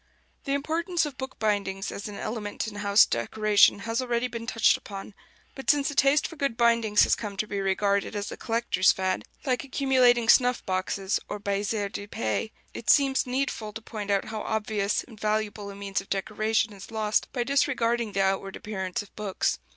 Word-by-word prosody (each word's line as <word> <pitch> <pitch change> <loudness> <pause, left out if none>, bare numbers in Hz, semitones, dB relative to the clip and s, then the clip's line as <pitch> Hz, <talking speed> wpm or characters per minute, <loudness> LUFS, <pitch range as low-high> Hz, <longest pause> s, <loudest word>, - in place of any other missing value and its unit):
The 275 - 0
importance 325 +4 0
of 290 -3 -6
bookbindings 205 -6 -2
as 200 - -6
an 205 - -7
element 215 -1 -4
in 210 -1 -7
house 205 0 +5
decoration 205 - +3
has 230 +3 -1
already 240 -1 0
been 230 -1 -7
touched 230 -2 +4
upon; 200 0 -8 0.4
but 270 -3 -6
since 290 -1 +3
a - - -8
taste 280 +2 +4
for 330 - -11
good 275 -6 -2
bindings 230 -3 +4
has - - +3
come 205 -3 -3
to 215 - 0
be 200 -1 -4
regarded 200 +2 0
as 205 0 -3
a - - -5
collector's 225 -5 +2
fad, 190 0 -1 0.2
like 255 -2 0
accumulating 255 -4 +3
snuff 250 +1 +4
boxes 190 +1 -1
or 210 - -3
baisers 200 0 -1
de 205 - -6
paix, 115 - -2 0.2
it 235 - -6
seems 270 -2 +4
needful 250 -4 -2
to 225 - -7
point 210 -3 -6
out 200 -1 +1
how 220 -1 -5
obvious 210 -2 -1
and 225 -4 -15
valuable 210 -1 -1
a 200 - -8
means 200 -1 -3
of 195 - -17
decoration 215 +2 0
is 195 -1 -11
lost 215 -1 0
by 245 - -1
disregarding 240 -5 +1
the 195 - +2
outward 195 0 -1
appearance 190 -3 -4
of 205 - -20
books. 205 - -1
215 Hz, 190 wpm, -27 LUFS, 200-245 Hz, 0.4 s, house